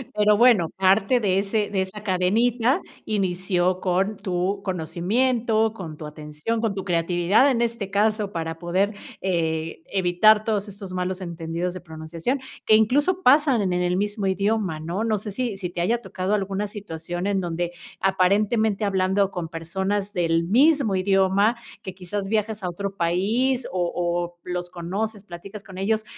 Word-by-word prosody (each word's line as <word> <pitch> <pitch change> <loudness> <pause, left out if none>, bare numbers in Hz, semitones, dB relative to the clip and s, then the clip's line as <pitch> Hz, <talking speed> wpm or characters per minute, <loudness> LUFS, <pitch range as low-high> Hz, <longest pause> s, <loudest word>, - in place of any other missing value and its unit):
Pero 210 0 +4
bueno, 230 -9 +5
parte 195 +6 +3
de 195 -3 +2
ese 205 +1 0
de 195 -2 0
esa 195 +3 -5
cadenita 225 +7 +2 0.3
inició 185 -2 0
con 190 +3 +1
tu 190 0 -2
conocimiento, 220 +6 +1
con 165 -7 -8
tu 155 - -8
atención, 150 +9 -4
con 220 -3 0
tu 195 -1 -4
creatividad, 175 +8 +3
en 235 -3 +1
este 230 -4 -2
caso, 210 0 +1
para 165 -1 -4
poder, 185 +4 0 0.3
eh, 160 -3 -1
evitar 195 +3 +4
todos 210 -2 0
estos 195 -2 -8
malos 180 +1 -2
entendidos 170 +1 -3
de 185 - -8
pronunciación, 165 - -4 0.3
que 215 - +6
incluso 290 - +3
pasan 275 - +5
en 185 -2 0
en 180 - 0
el 180 +1 +1
mismo 205 0 -1
idioma, 195 -3 0
¿no? 170 +7 -3
No 220 -2 +1
sé 205 +1 -6
si 240 -5 -2
si 180 -3 -4
te 175 -1 -4
haya 235 +6 +1
tocado 190 0 -3
alguna 195 +1 -2
situación 175 -2 -5
en 195 -2 +1
donde, 175 0 -2 0.3
aparentemente, 200 +3 +2
hablando 190 0 +2
con 170 -3 -4
personas 190 +5 -2
del 165 -2 +1
mismo 260 - +4
idioma, 195 +4 +3 0.2
que 190 -3 -7
quizás 195 +2 -4
viajas 215 -1 -1
a 180 - -1
otro 195 +2 -5
país, 220 +10 +1
o 175 -2 0
o 175 0 -2
los 180 0 -4
conoces, 195 +5 -4
platicas 195 +3 -9
con 190 -3 -12
ellos 215 +3 0
195 Hz, 165 wpm, -24 LUFS, 175-215 Hz, 0.3 s, que